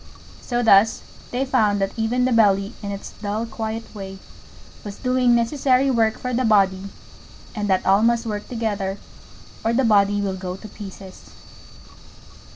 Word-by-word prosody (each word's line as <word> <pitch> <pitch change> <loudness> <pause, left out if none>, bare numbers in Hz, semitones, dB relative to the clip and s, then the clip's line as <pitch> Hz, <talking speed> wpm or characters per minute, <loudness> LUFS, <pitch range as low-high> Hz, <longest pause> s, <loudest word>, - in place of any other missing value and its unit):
So 240 -1 -2
thus 220 0 +4 0.3
they 255 +2 -1
found 210 -5 +2
that 195 0 -1
even 235 +3 0
the 255 - +1
Belly 205 -2 +3
in 200 -1 -5
its 200 0 -7
dull 210 +2 -2
quiet 225 0 -6
way 195 -2 -8 0.7
was 205 -1 -7
doing 250 -1 +2
necessary 260 +2 +2
work 225 -3 +1
for 250 0 -4
the 255 +2 +1
Body, 195 -4 +3 0.7
and 210 -1 -3
that 190 -2 +1
all 195 +2 +4
must 235 +1 +2
work 210 -2 -4
together 205 -5 -2 0.7
or 225 - +1
the 260 +2 +2
Body 205 -2 +3
will 195 -2 -2
go 185 -1 -5
to 215 - -10
pieces. 195 -2 -11
220 Hz, 160 wpm, -22 LUFS, 200-235 Hz, 0.7 s, thus